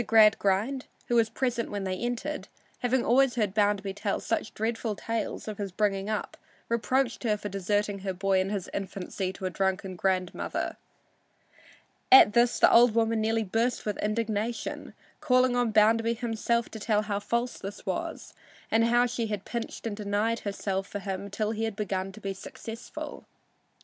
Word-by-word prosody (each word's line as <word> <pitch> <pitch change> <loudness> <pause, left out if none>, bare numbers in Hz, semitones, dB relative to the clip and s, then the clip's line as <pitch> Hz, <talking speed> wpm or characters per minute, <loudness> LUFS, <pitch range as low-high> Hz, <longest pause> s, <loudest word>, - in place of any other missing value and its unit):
Gradgrind, 220 +3 +4 0.2
who 240 - +2
was 225 -1 +4
present 245 -2 -1
when 205 -1 -3
they 190 -1 -1
entered, 245 +8 -3 0.3
having 250 0 +1
always 260 +1 +4
heard 210 -5 0
Bounderby 205 -2 +1
tell 205 0 -2
such 225 - -2
dreadful 225 0 -1
tales 225 +2 -3
of 215 -1 -5
his 200 -2 -3
bringing 195 +1 0
up, 215 -1 -3 0.3
reproached 235 +2 +1
her 215 -3 +1
for 205 - -5
deserting 205 +1 -1
her 190 0 -3
boy 190 +1 +1
in 190 +1 0
his 200 -3 -3
infancy 190 -1 -3
to 190 - -7
a 185 - -1
drunken 190 +1 -1
grandmother. 185 -1 -1 1.4
At 260 -5 +9
this 240 0 +4
the - - +6
old 235 -1 +7
woman 225 -1 +2
nearly 225 +1 +1
burst 225 +5 0
with 210 -2 -2
indignation, 215 +1 -2 0.2
calling 255 -1 +3
on 245 -1 +2
Bounderby 225 +2 +4
himself 235 0 -1
to 220 - -8
tell 210 0 +1
how 205 -1 -2
false 235 +4 -2
this 195 +1 -8
was - - -4 0.4
and 225 +1 +4
how 240 +1 +4
she 235 -2 -2
had 210 -2 -4
pinched 235 -1 -5
and 220 -3 -2
denied 210 +2 0
herself 195 -1 -3
for - - -5
him 195 0 -4
till 210 +2 -1
he 225 0 -1
had 220 -2 -3
begun 195 -2 -2
to 215 - -11
be 195 -2 -3
successful. 225 +4 -8
215 Hz, 170 wpm, -28 LUFS, 200-230 Hz, 1.4 s, At